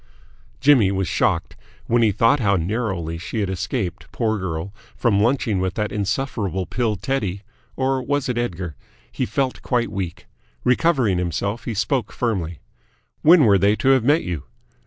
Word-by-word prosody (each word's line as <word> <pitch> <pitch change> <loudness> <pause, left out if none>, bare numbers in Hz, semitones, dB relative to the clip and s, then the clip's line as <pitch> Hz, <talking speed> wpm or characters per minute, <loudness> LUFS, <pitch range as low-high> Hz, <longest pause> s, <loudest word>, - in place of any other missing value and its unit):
Jimmy 130 -7 +5
was 95 -2 -1
shocked. - - 0 0.3
When 120 +1 +2
he 110 -2 +4
thought 115 +8 +3
how 100 -4 +2
narrowly 90 -3 -2
she 105 +6 -3
had 95 -2 -1
escaped, 95 0 -3
poor 110 -3 0
girl, 90 +1 -4 0.2
from 110 -5 +2
lunching 110 -3 +1
with 95 0 -1
that 105 -1 -1
insufferable 100 -3 -2
pill 115 -1 -1
Teddy 100 -4 -2 0.3
or 130 0 0
was 145 +1 -1
it 125 - -1
Edgar? 90 -9 -3 0.4
he - - -2
felt 130 +4 -1
quite 120 -3 0
weak. 90 -3 -5 0.4
Recovering 125 - +2
himself, 100 +6 -2
he 115 - -3
spoke 110 0 0
firmly. 90 -9 -2 0.6
"When 165 0 +7
were 100 -3 +5
they 100 +2 +4
to 130 - +1
have 135 -3 +5
met 145 +6 +3
you?" 85 -6 -4
105 Hz, 160 wpm, -22 LUFS, 95-125 Hz, 0.6 s, When